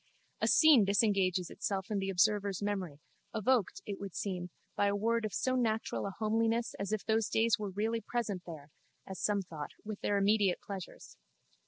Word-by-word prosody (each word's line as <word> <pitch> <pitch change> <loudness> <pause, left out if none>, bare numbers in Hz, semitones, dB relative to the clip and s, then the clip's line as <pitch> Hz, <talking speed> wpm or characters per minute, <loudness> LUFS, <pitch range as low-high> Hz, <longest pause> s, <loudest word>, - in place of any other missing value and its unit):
A - - +2
scene 305 -8 +7
disengages 195 -3 +2
itself 195 0 -3
in 205 - +1
the 195 0 -2
observer's 200 +1 +1
memory, 185 -8 -3 0.3
evoked, 240 - +1
it 200 - -5
would 200 -3 -7
seem, 180 -3 -3 0.3
by 205 - +2
a 200 - +1
word 230 +2 +1
of 215 - -3
so 255 +7 0
natural 235 -2 0
a 195 - -5
homeliness 225 +2 +1
as 200 +1 -3
if 215 -2 -2
those 220 0 +1
days 225 -1 +2
were 205 -1 -3
really 220 +4 -1
present 215 -4 -2
there 155 -3 -9 0.3
(as 190 -2 -7
some 205 -2 +1
thought) 155 -5 -7
with 210 -1 -6
their 205 - +1
immediate 200 -2 +3
pleasures. 195 -3 -9
205 Hz, 180 wpm, -32 LUFS, 190-220 Hz, 0.3 s, scene